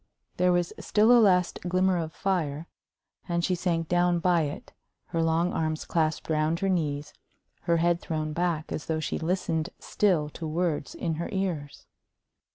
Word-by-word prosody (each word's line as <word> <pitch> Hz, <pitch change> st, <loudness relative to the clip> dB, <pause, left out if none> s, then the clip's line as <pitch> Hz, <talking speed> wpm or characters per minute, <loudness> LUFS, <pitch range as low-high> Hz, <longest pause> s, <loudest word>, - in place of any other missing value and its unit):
There 180 Hz, 0 st, +3 dB
was 175 Hz, -1 st, +1 dB
still 215 Hz, +3 st, +3 dB
a 240 Hz, -1 st, +7 dB
last 180 Hz, -4 st, +3 dB
glimmer 185 Hz, 0 st, +1 dB
of 160 Hz, -1 st, -3 dB
fire, 165 Hz, -6 st, -1 dB, 0.6 s
and 170 Hz, 0 st, +1 dB
she 185 Hz, -, +1 dB
sank 170 Hz, -2 st, -1 dB
down 175 Hz, 0 st, +2 dB
by 175 Hz, 0 st, +3 dB
it, 145 Hz, -, -7 dB, 0.4 s
her 165 Hz, -, 0 dB
long 165 Hz, +2 st, +1 dB
arms 155 Hz, -1 st, -1 dB
clasped 160 Hz, -2 st, 0 dB
round 155 Hz, +1 st, +1 dB
her 195 Hz, -, +1 dB
knees, 150 Hz, -5 st, -1 dB, 0.5 s
her 170 Hz, -1 st, +3 dB
head 170 Hz, +1 st, +2 dB
thrown 155 Hz, -1 st, -3 dB
back 170 Hz, -2 st, -1 dB
as 150 Hz, -, -4 dB
though 160 Hz, -1 st, 0 dB
she 155 Hz, -, -2 dB
listened 165 Hz, -1 st, -1 dB
still 180 Hz, -8 st, +1 dB
to 160 Hz, +2 st, -6 dB
words 160 Hz, -2 st, -1 dB
in 165 Hz, -, -2 dB
her -, -, -3 dB
ears. 175 Hz, -7 st, -3 dB
170 Hz, 165 wpm, -27 LUFS, 155-180 Hz, 0.6 s, a